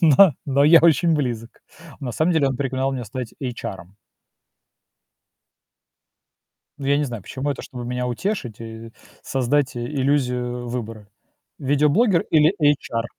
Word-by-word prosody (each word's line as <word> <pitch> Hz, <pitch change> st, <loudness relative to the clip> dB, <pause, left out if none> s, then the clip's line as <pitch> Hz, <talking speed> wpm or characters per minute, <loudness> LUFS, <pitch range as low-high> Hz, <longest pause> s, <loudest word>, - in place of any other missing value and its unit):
Но 165 Hz, +2 st, +7 dB
но 140 Hz, +1 st, +3 dB
я 165 Hz, +2 st, +8 dB
очень 165 Hz, 0 st, +4 dB
близок. 120 Hz, -5 st, -2 dB, 0.5 s
На 125 Hz, -4 st, -4 dB
самом 160 Hz, +8 st, +1 dB
деле, 145 Hz, -4 st, +2 dB
он 130 Hz, -, -3 dB
пригнал 135 Hz, 0 st, -1 dB
меня 125 Hz, -3 st, -4 dB
стать 125 Hz, +1 st, -7 dB
эйчаром. 100 Hz, -7 st, -6 dB, 2.8 s
Ну 135 Hz, -, -5 dB
я 140 Hz, 0 st, +3 dB
не 150 Hz, -, +1 dB
знаю, 120 Hz, -7 st, -6 dB
почему. 135 Hz, +6 st, -4 dB
Это 140 Hz, -, -4 dB
чтобы 125 Hz, -2 st, -8 dB
меня 125 Hz, +1 st, -3 dB
утешить 125 Hz, -, -3 dB
и 115 Hz, 0 st, -9 dB, 0.3 s
создать 135 Hz, +1 st, 0 dB
иллюзию 125 Hz, -2 st, -1 dB
выбора: 115 Hz, -3 st, -6 dB, 0.5 s
видеоблогер 150 Hz, -, +3 dB
или 155 Hz, +4 st, +4 dB
эйчар. 145 Hz, -6 st, +1 dB
130 Hz, 130 wpm, -22 LUFS, 120-145 Hz, 2.8 s, я